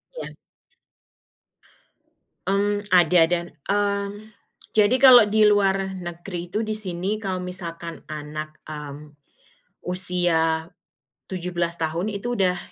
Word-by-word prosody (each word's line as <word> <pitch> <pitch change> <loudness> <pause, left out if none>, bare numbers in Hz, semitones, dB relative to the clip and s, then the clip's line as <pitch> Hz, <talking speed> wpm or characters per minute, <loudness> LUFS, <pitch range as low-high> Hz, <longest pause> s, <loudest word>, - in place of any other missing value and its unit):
Iya. - - -6 2.2
Mmm, 205 +1 0
ada 170 -1 +5
dan, 170 0 -1 0.2
mmm, 205 +1 -1 0.4
jadi 215 +3 +4
kalau 245 -5 +9
di 215 +1 +3
luar 195 -2 +3
negeri 175 0 -6
itu, 210 +6 -2
di 215 - -3
sini 190 +2 -3
kalau 185 -3 -3
misalkan 170 -2 -6
anak, 155 0 -6
mmm, 150 -1 -8 0.7
usia 175 -3 +1 0.6
17 175 -2 -3
tahun, 165 +6 -2
itu 235 +4 -3
udah 180 -4 +1
180 Hz, 105 wpm, -23 LUFS, 170-205 Hz, 2.2 s, kalau